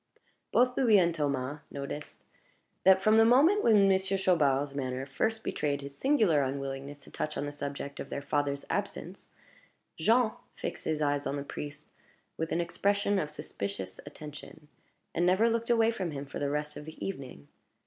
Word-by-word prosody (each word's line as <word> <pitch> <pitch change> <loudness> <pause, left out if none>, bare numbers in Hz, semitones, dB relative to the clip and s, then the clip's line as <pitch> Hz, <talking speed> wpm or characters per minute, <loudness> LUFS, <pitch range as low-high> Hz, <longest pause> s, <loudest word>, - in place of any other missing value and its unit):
Both 250 0 +3
Louis 230 -6 +5
and 170 -3 +3
Thomas 140 -2 -2
noticed 140 +1 -7 0.6
that, 190 0 +6
from 215 +1 +5
the 225 - +8
moment 290 - +5
when 210 -4 +6
Monsieur 190 0 +2
Chaubard's 145 -7 +2
manner 130 -1 -3
first 220 +11 -1
betrayed 145 -1 -1
his 140 0 -8
singular 215 - +3
unwillingness 140 +1 -4
to - - -15
touch 150 - -3
on 145 - -2
the 145 - -4
subject 140 -1 -5
of 135 - -6
their 140 - -4
father's 140 -1 -1
absence, - - -4 0.7
Jean 225 +6 +4 0.2
fixed - - -5
his 155 -1 0
eyes 145 0 0
on 140 - -2
the 140 - -3
priest 145 +1 -7 0.4
with 160 0 -3
an 170 - +1
expression 200 +3 +1
of 150 - -2
suspicious 100 -9 -5
attention, 150 0 -11 0.4
and 170 - +1
never 190 +6 +4
looked 230 +1 -1
away 230 -1 +4
from 190 -6 -3
him 140 -2 -5
for 140 - -7
the 145 - 0
rest 150 +1 -3
of 150 - -8
the 160 - -7
evening. 130 - -7
150 Hz, 175 wpm, -30 LUFS, 140-195 Hz, 0.7 s, the